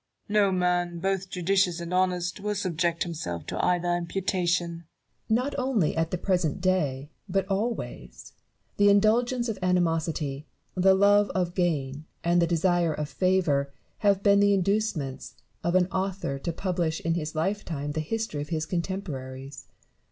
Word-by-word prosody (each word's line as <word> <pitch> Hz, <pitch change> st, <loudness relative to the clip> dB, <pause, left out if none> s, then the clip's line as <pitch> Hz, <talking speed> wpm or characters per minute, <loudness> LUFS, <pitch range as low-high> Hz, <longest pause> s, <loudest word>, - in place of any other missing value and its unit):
No 205 Hz, -1 st, +3 dB
man, 180 Hz, -1 st, +1 dB
both 190 Hz, +1 st, -1 dB
judicious 180 Hz, -1 st, +1 dB
and 170 Hz, +1 st, -5 dB
honest, 180 Hz, 0 st, 0 dB
will 210 Hz, +1 st, -2 dB
subject 170 Hz, -3 st, 0 dB
himself 90 Hz, -, -5 dB
to -, -, -3 dB
either 175 Hz, -1 st, +2 dB
imputation, 175 Hz, -1 st, -1 dB, 0.4 s
Barrow. 230 Hz, +3 st, +3 dB
Not 285 Hz, -, -4 dB
only 250 Hz, -, +1 dB
at 165 Hz, 0 st, 0 dB
the 180 Hz, -, -2 dB
present 180 Hz, -3 st, 0 dB
day, 150 Hz, -7 st, 0 dB, 0.2 s
but 195 Hz, 0 st, +1 dB
always, 210 Hz, +5 st, -4 dB, 0.4 s
the 205 Hz, 0 st, +5 dB
indulgence 235 Hz, +4 st, +3 dB
of 225 Hz, -, -3 dB
animosity, 165 Hz, -5 st, 0 dB, 0.3 s
the 190 Hz, +1 st, +4 dB
love 205 Hz, +1 st, +4 dB
of 180 Hz, -2 st, 0 dB
gain, 155 Hz, -5 st, -1 dB, 0.2 s
and 175 Hz, +1 st, +3 dB
the 170 Hz, -, +3 dB
desire 170 Hz, -1 st, +2 dB
of 150 Hz, -1 st, -4 dB
favour 155 Hz, -5 st, +1 dB, 0.3 s
have 200 Hz, -2 st, +2 dB
been 200 Hz, -1 st, +5 dB
the 205 Hz, 0 st, +4 dB
inducements 185 Hz, -9 st, -1 dB, 0.3 s
of 170 Hz, +1 st, 0 dB
an 185 Hz, -1 st, +5 dB
author 190 Hz, -7 st, -2 dB
to 170 Hz, -, -3 dB
publish 170 Hz, -2 st, -1 dB
in 165 Hz, -, 0 dB
his 155 Hz, -2 st, -3 dB
lifetime 160 Hz, -4 st, -2 dB
the 155 Hz, -, -3 dB
history 215 Hz, -2 st, -3 dB
of 145 Hz, -, -6 dB
his 160 Hz, -2 st, -1 dB
contemporaries. 140 Hz, -8 st, -5 dB
180 Hz, 150 wpm, -27 LUFS, 160-195 Hz, 0.4 s, the